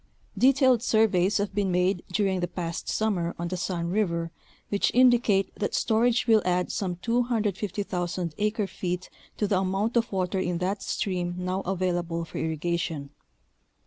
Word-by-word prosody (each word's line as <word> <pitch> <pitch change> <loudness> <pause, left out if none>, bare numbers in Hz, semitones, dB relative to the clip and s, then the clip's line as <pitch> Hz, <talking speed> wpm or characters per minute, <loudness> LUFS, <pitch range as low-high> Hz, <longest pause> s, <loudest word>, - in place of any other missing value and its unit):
Detailed 260 +1 +4
surveys 210 -5 +3
have 200 0 -2
been 200 -2 0
made 180 +1 +1
during 195 -3 +1
the 175 - -1
past 170 -2 -4
summer 185 -6 0
on 170 0 -3
the 185 - -2
Sun 175 -1 -2
River 170 -5 0 0.4
which 200 - +2
indicate 240 -6 +4
that 205 - -2
storage 230 +2 +2
will 220 -2 +5
add 180 0 0
some 185 -3 -2
250,000 200 -7 -1
acre 210 0 0
feet 180 -1 -4 0.3
to 210 - +1
the 195 -2 +2
amount 195 +5 -1
of 235 0 +1
water 190 -1 -1
in 175 -2 -1
that 190 +3 -2
stream 175 -3 -2
now 185 +1 -2
available 175 -3 -1
for - - -7
irrigation. 160 -2 -2
190 Hz, 150 wpm, -27 LUFS, 175-215 Hz, 0.4 s, will